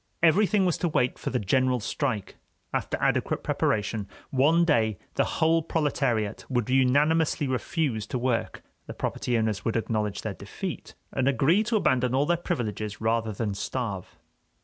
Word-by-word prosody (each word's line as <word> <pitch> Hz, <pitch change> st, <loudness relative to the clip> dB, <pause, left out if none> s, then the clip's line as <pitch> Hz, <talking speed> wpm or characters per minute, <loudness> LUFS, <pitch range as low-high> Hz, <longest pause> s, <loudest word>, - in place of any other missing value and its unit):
Everything 195 Hz, +4 st, +4 dB
was 180 Hz, -, +1 dB
to 175 Hz, -, +1 dB
wait 125 Hz, -5 st, 0 dB
for -, -, -3 dB
the 125 Hz, -, 0 dB
general 125 Hz, +4 st, +2 dB
strike; 110 Hz, -1 st, -2 dB, 0.4 s
after -, -, -1 dB
adequate -, -, 0 dB
preparation, 105 Hz, -1 st, 0 dB, 0.2 s
one 155 Hz, +6 st, +4 dB
day 110 Hz, -, +2 dB, 0.2 s
the -, -, +2 dB
whole 165 Hz, +1 st, +3 dB
proletariat 135 Hz, -9 st, -1 dB
would 120 Hz, -4 st, 0 dB
unanimously 145 Hz, +4 st, +3 dB
refuse 130 Hz, -3 st, -1 dB
to 125 Hz, -, -2 dB
work, 120 Hz, -1 st, -1 dB, 0.2 s
the -, -, -7 dB
property 120 Hz, -1 st, -1 dB
owners 110 Hz, -3 st, -1 dB
would 115 Hz, -, -1 dB
acknowledge 110 Hz, -2 st, -2 dB
their -, -, -3 dB
defeat, -, -, -7 dB, 0.2 s
and 130 Hz, 0 st, 0 dB
agree 140 Hz, -, +3 dB
to 225 Hz, +1 st, -1 dB
abandon 130 Hz, -, +2 dB
all 140 Hz, +2 st, +3 dB
their 175 Hz, +3 st, +2 dB
privileges 110 Hz, -10 st, -3 dB
rather 115 Hz, 0 st, 0 dB
than 105 Hz, 0 st, -2 dB
starve. 100 Hz, -2 st, -4 dB
125 Hz, 155 wpm, -27 LUFS, 110-150 Hz, 0.4 s, Everything